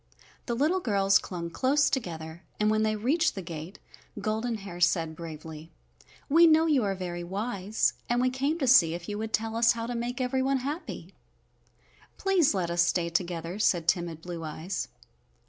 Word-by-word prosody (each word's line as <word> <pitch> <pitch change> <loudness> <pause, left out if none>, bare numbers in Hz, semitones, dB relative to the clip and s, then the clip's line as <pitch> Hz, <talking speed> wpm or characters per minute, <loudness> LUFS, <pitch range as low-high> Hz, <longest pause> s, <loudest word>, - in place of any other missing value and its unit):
The 235 - -1
little 310 +9 +2
girls 200 - +3
clung 170 -2 -6
close 280 +8 +2
together, 165 -8 -4 0.2
and 210 0 +3
when 215 0 +2
they 215 0 +1
reached 260 +10 +1
the 190 - -5
gate 165 +2 -7 0.4
Golden 220 +3 -1
Hair 195 -4 -8
said 165 -2 +2
bravely, 160 -1 -9 0.6
"We 330 +4 +6
know 320 0 +5
you 295 -7 +3
are 195 -1 0
very 175 -2 -5
wise 200 +2 -1 0.2
and 240 0 +2
we 255 0 +2
came 275 +5 -1
to 275 -6 -1
see 170 -10 +6
if 175 0 -8
you 210 0 -4
would 220 0 -4
tell 225 0 -1
us 230 0 +4
how 230 -1 -4
to 245 - -4
make 240 +2 -3
everyone 260 +1 +1
happy." 300 +5 -5 1.0
"Please 365 - +2
let 175 -3 -1
us 170 0 +2
stay 170 0 +1
together," 170 +1 -3
said 175 -6 +2
timid 170 -2 0
Blue 175 -2 -6
Eyes. 160 +4 -4
205 Hz, 180 wpm, -28 LUFS, 170-250 Hz, 1.0 s, We